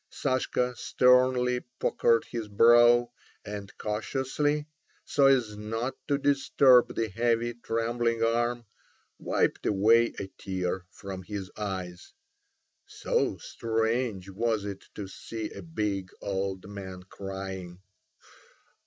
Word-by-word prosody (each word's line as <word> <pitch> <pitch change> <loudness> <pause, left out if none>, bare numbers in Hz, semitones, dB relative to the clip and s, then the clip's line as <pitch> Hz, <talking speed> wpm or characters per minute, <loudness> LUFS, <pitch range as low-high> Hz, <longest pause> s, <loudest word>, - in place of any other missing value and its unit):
Sashka 125 -2 -1
sternly 125 0 +3 0.2
puckered 115 -1 +2
his 115 -3 -5
brow, 120 +3 +6 0.3
and 100 -1 -6
cautiously—so 145 +5 -1
as 125 -6 +3
not 115 +4 -3
to 140 - +2
disturb 135 -3 +4
the 115 - 0
heavy 115 +3 0
trembling 115 0 -1
arm—wiped 120 -1 -2
away 115 +4 +4
a - - -3
tear 90 -1 -3
from 95 -1 -8
his 95 0 -6
eyes. 95 -4 -5 0.7
So - - -1
strange 115 -3 -1
was 110 +1 -1
it 100 -1 -6
to 100 -2 -5
see 110 +3 -6
a - - -8
big 105 - -3
old 95 -1 -3
man 95 -2 -8
crying. 95 -2 -7
115 Hz, 100 wpm, -28 LUFS, 100-120 Hz, 0.7 s, brow